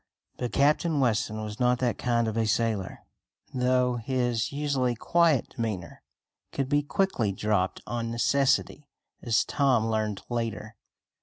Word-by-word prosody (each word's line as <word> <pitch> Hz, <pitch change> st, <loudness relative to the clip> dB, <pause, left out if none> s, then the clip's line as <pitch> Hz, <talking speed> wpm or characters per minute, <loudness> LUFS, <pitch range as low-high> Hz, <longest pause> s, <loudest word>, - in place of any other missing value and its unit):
But 125 Hz, -, -3 dB
Captain 150 Hz, +2 st, +2 dB
Weston 110 Hz, -3 st, 0 dB
was 105 Hz, 0 st, -7 dB
not 125 Hz, 0 st, +3 dB
that 120 Hz, -2 st, -1 dB
kind 120 Hz, -2 st, +1 dB
of 110 Hz, -, -3 dB
a 115 Hz, -1 st, +1 dB
sailor, 110 Hz, -3 st, -1 dB, 0.5 s
though 125 Hz, -1 st, +1 dB
his 120 Hz, -1 st, -1 dB
usually 140 Hz, -4 st, 0 dB
quiet 165 Hz, +2 st, +2 dB
demeanor 110 Hz, -9 st, -5 dB, 0.5 s
could 135 Hz, -1 st, -2 dB
be 145 Hz, 0 st, +3 dB
quickly 145 Hz, -, 0 dB
dropped 95 Hz, -1 st, -1 dB
on 115 Hz, -1 st, -3 dB
necessity, 140 Hz, +4 st, +1 dB, 0.3 s
as 115 Hz, -3 st, +2 dB
Tom 130 Hz, -6 st, +2 dB
learned 110 Hz, -3 st, -2 dB
later. 115 Hz, -2 st, -4 dB
120 Hz, 135 wpm, -27 LUFS, 110-135 Hz, 0.5 s, not